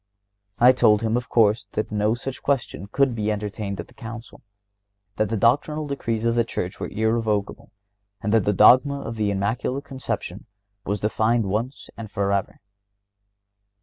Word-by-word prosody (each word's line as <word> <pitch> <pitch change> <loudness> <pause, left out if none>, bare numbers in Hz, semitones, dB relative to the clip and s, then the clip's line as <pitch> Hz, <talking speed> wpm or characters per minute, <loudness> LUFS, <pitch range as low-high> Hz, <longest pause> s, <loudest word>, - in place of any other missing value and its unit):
I 125 +3 +7
told 110 -4 +3
him, 110 0 +1
of 120 0 -2
course, 105 -3 +3
that 110 - -2
no 105 +2 +1
such 130 +2 -6
question 120 - -2
could 135 +4 +1
be 110 -2 -1
entertained 105 -1 -4
in - - -4
the - - -21
Council; 115 0 -9 0.8
that 110 -2 +1
the 115 - -1
doctrinal 145 +7 +2
decrees 115 -6 -3
of 115 - +2
the 120 0 +2
Church 90 -5 -5
were - - -4
irrevocable, 110 -2 -1 0.5
and 105 +2 -2
that 110 -4 +3
the 105 - +3
dogma 130 +8 +5
of 115 - -6
the 105 -2 0
Immaculate 115 +8 -2
Conception 115 -8 -5 0.4
was 105 -1 -1
defined 110 +2 +1
once 115 +8 -3
and 110 -2 -8
forever. 100 -1 -1
110 Hz, 160 wpm, -23 LUFS, 105-120 Hz, 0.8 s, I